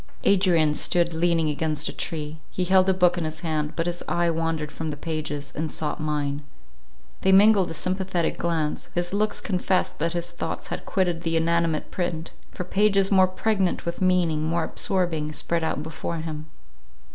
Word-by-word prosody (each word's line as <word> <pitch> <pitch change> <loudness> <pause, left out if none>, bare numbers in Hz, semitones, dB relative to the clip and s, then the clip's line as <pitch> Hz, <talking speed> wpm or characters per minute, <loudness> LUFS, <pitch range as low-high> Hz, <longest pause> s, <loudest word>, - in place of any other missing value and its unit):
Adrian 175 -6 +4
stood 170 +2 +1
leaning 165 -1 +2
against 150 0 -1
a - - -4
tree; 155 -1 -4
he 185 - -2
held 185 +1 +4
a - - +6
book 180 -1 +3
in - - -2
his 155 0 -4
hand, 155 -3 -1
but 165 - -1
his 175 0 -2
eye 170 0 +2
wandered 165 -2 -2
from 160 - -5
the 145 - -4
pages, 150 -2 -4
and 155 +1 -2
sought 150 -1 -2
mine; 150 -2 -1 0.8
they 190 - +3
mingled 200 -1 +6
a - - -4
sympathetic 185 -1 -1
glance; 160 -3 -2
his 175 +1 -1
looks 210 +1 0
confessed 185 -1 0
that 165 +2 0
his 175 0 -2
thoughts - - -5
had - - -5
quitted 180 -4 0
the 165 -1 0
inanimate 165 -1 +1
print, 170 -3 -3 0.2
for - - -5
pages 195 +1 +2
more 190 -1 +6
pregnant 190 0 0
with 170 +3 -4
meaning, 175 -4 +2
more 165 +1 0
absorbing, 165 -4 0
spread 165 +2 -1
out 150 -2 -1
before 160 +1 -4
him. 155 -1 -5
170 Hz, 180 wpm, -25 LUFS, 155-185 Hz, 0.8 s, a